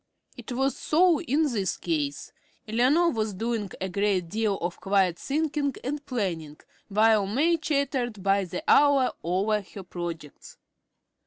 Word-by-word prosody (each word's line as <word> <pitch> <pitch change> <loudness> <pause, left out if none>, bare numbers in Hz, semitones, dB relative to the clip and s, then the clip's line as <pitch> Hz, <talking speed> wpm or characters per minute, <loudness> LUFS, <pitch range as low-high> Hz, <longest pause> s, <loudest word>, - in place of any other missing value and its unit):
It - - -9
was 270 +2 0
so 335 0 +3
in 310 -1 +1
this 225 -10 -1
case. 150 -4 -3 0.3
Eleanor 265 +10 +3
was 215 -3 -2
doing 225 0 -2
a 190 - -2
great 190 -2 0
deal 215 0 0
of 175 0 -4
quiet 195 -3 +2
thinking 290 -1 -1
and 290 +3 -3
planning 170 - -3 0.3
while 215 0 +3
May 295 - +2
chattered 270 - -1
by 195 0 +2
the 185 - -6
hour 285 -3 +5
over 200 +5 +1
her 195 0 -11
projects. 170 -4 -7
215 Hz, 140 wpm, -26 LUFS, 190-275 Hz, 0.3 s, hour